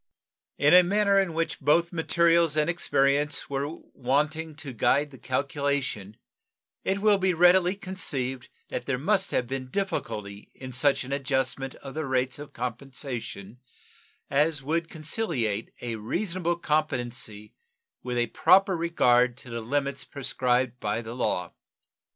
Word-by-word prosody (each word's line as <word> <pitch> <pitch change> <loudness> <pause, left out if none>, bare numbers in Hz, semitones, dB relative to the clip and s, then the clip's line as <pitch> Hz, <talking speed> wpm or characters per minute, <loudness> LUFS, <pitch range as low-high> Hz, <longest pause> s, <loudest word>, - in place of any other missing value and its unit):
In 145 +2 +4
a 180 - +10
manner 200 +2 +3
in 190 -3 +1
which 165 0 -1
both 170 +4 +2
materials 170 -1 +3
and 150 - +3
experience 145 -3 +1
were 140 +1 -1 0.3
wanting 150 +5 -1
to 145 -4 -7
guide 145 +5 +2
the 130 - -13
calculation 135 -6 -2 0.7
it 195 - 0
will 210 -2 +4
be 185 -2 +1
readily 180 +2 +5
conceived 140 - -3 0.2
that - - -4
there 135 -2 0
must 190 +7 +1
have 125 - 0
been 130 +1 -5
difficulty 110 - -4
in 130 -1 -9
such 135 +2 +2
an 130 +2 -5
adjustment 135 -1 -1
of 135 -1 -10
the 155 -2 -3
rates 130 0 0
of 145 - -9
compensation 125 -3 -6 0.7
as 145 0 +1
would 165 +3 -1
conciliate 150 - -2
a 115 -2 -3
reasonable 175 - -1
competency 125 -10 -2 0.5
with 125 -1 -3
a 120 - +2
proper 195 - +4
regard 125 -8 +3
to 130 -3 -12
the 115 0 -4
limits 140 +3 -1
prescribed 125 -2 0
by 105 +3 -2
the 115 +1 -7
law. 90 -8 -1
140 Hz, 140 wpm, -27 LUFS, 125-165 Hz, 0.7 s, a